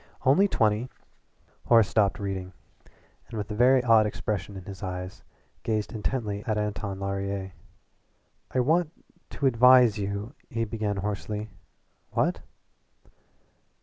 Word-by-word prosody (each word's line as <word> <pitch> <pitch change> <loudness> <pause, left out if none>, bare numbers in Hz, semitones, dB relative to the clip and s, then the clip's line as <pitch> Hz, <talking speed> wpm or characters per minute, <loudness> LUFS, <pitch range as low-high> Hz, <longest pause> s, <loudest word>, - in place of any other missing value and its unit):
Only 175 +10 +5
twenty 110 - +1 0.4
" - - -37
Horace 115 -3 +6
stopped 100 -3 +2
reading, 95 -2 -4 0.7
and 115 - -7
with 105 0 -4
a - - -3
very 125 +3 +5
odd 115 -3 +5
expression 100 -2 -4
in 95 - -9
his 100 -1 -9
eyes 90 +1 -5 0.4
gazed 110 +1 -2
intently 105 -2 -2
at 110 -1 0
Anton 100 -2 -3
Laurier. 100 0 -3 1.0
"I 130 - +1
want 160 +5 +2 0.4
to 140 - -4
advise 125 -3 +6
you 100 +4 -4
" - - -38
he 115 -3 -1
began 105 -2 -2
hoarsely. 105 +2 -4 0.6
"What?" - - 0
105 Hz, 130 wpm, -27 LUFS, 100-115 Hz, 1.0 s, Horace